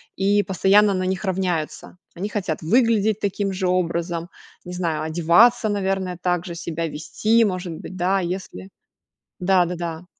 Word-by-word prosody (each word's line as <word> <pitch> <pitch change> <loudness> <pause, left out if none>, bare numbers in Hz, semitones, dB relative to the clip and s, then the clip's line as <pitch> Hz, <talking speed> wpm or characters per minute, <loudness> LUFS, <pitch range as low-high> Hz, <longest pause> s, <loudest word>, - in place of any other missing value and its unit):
и 200 +2 +2
постоянно 195 +2 +3
на 185 0 -1
них 190 +2 -2
равняются. 180 -3 -3 0.2
Они 195 +4 -4
хотят 185 -7 -3
выглядеть 220 +2 +2
таким 200 0 -1
же 185 -1 -2
образом, 170 -1 -1 0.3
не 180 -1 -8
знаю, 170 -3 -2
одеваться, 175 +9 +4
наверное, 190 -3 -2
так 180 -1 0
же 170 - -6
себя 165 0 -4
вести, 215 +9 +1
может 185 -3 -3
быть, 185 - -9
да, 185 +2 +1
если 175 - -5 0.7
Да-да-да. 175 -2 0
185 Hz, 140 wpm, -22 LUFS, 170-195 Hz, 0.7 s, одеваться